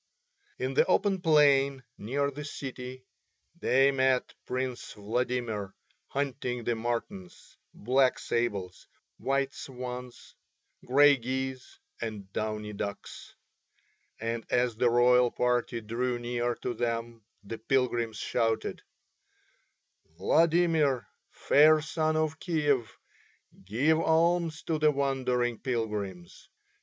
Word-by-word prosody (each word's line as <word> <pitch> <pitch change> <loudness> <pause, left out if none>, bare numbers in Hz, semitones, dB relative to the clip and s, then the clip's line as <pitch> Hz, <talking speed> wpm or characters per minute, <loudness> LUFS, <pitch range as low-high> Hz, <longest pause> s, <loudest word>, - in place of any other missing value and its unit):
In 130 +1 -2
the - - +5
open 195 0 +2
plain 140 -5 +4
near 140 +6 -1
the 145 +2 -7
city 130 -2 -7 0.5
they 135 -1 +4
met 130 -1 +1
Prince 130 -1 -3
Vladimir 110 -2 -2 0.3
hunting 130 -3 -3
the 120 - 0
martens, 115 -5 -5 0.2
black 130 +3 +2
sables, 100 -6 -3 0.3
white 135 0 0
swans, 125 -1 -8 0.5
grey 145 +2 +5
geese, 130 +1 -4 0.2
and 105 -4 -6
downy 105 -1 -3
ducks, 100 0 -7 0.8
and 115 0 -3
as 125 -2 +1
the 120 +2 +3
royal 125 +1 +5
party 120 -1 0
drew 120 +3 -2
near 120 0 -2
to 125 - -4
them 115 -1 -3 0.2
the 110 +3 -7
pilgrims 120 -2 0
shouted: 115 +1 -1 1.4
"Vladimir, 160 - +2 0.2
Fair 155 +2 +5
Sun 155 0 -1
of 155 0 -1
Kiev, 145 -9 0 0.7
give 140 +11 +2
alms 165 0 +2
to 160 -2 -1
the 155 0 +5
wandering 130 -4 0
pilgrims. 105 -8 -4
125 Hz, 105 wpm, -29 LUFS, 115-140 Hz, 1.4 s, the